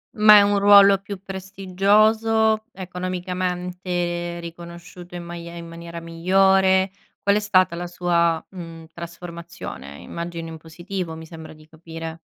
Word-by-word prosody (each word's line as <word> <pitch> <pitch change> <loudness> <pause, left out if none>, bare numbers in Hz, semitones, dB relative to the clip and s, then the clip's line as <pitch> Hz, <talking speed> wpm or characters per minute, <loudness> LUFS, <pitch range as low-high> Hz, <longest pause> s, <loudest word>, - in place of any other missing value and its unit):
Ma 210 -1 +8
è - - +8
un 200 0 +2
ruolo 200 -1 +7
più 200 -1 -8
prestigioso? 205 +4 +2
Economicamente 180 -1 -3
riconosciuto 170 +1 -10
in 175 - -6
maie 170 0 -8
in 170 0 -8
maniera 170 0 -8
migliore? 190 +3 +3 0.3
Qual 200 0 +3
è - - +3
stata 185 -4 +2
la 175 +1 -5
sua, 170 -2 +1
mhmm, 165 -3 -9
trasformazione? 170 - -9
Immagino 170 -1 -6
in 160 0 -8
positivo 170 +2 -6
mi 160 0 -9
sembra 160 -1 -11
di 155 0 -18
capire. 165 0 -8
175 Hz, 130 wpm, -22 LUFS, 170-195 Hz, 0.3 s, Ma